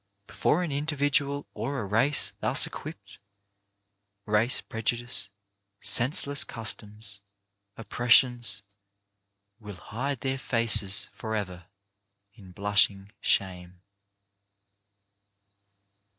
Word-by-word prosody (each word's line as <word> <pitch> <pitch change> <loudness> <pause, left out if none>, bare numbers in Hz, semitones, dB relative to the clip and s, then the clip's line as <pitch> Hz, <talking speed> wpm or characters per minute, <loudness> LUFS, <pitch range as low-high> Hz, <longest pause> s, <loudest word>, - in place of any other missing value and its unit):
Before 175 - 0
an 165 - -3
individual 145 -1 0
or 140 0 -4
a 110 - -4
race 115 +9 +1
thus - - +3
equipped, - - -10 1.1
race 105 +4 +2
prejudice, 115 -1 -2 0.5
senseless 130 +6 +1
customs, 105 -2 -3 0.6
oppressions, 120 -2 +2 1.0
will 105 -3 -9
hide 130 +8 -5
their 135 0 -2
faces 115 -5 +3
forever 100 -6 -5 0.7
in 100 -4 -15
blushing 100 0 +1
shame. 90 -1 -1
115 Hz, 80 wpm, -27 LUFS, 100-135 Hz, 1.1 s, thus